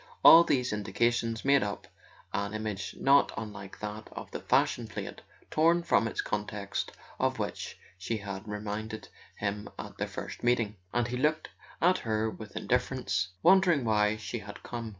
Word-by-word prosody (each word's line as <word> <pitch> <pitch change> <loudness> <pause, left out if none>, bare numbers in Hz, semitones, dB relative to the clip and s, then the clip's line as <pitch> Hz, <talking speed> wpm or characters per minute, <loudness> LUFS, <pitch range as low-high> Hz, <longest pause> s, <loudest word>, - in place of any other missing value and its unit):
All 165 +1 +11
these 125 -8 +1
indications 115 +3 0
made 140 0 +5
up 100 0 -3 0.5
an 100 +1 -2
image 105 -3 -4
not 140 +1 +5
unlike 105 -3 -7
that 105 +1 -6
of - - -8
the - - -4
fashion - - +2
plate - - -6 0.3
torn 170 +2 +4
from 140 -9 +3
its - - -2
context 105 -1 -3 0.3
of - - +1
which - - -4 0.2
she 110 +5 -2
had 100 0 -6
reminded 105 +1 -5 0.3
him 105 +1 -3
at - - -8
their - - -1
first - - -7
meeting; 115 -4 +1
and 120 0 0
he 125 - -2
looked 150 +4 +1 0.3
at 180 +2 +5
her 110 0 0
with 110 -2 -10
indifference, 125 -8 0 0.2
wondering 180 -7 +5
why 105 -1 +3
she 110 +2 -5
had 100 -1 -10
come. 115 -2 -5
110 Hz, 160 wpm, -30 LUFS, 105-125 Hz, 0.5 s, All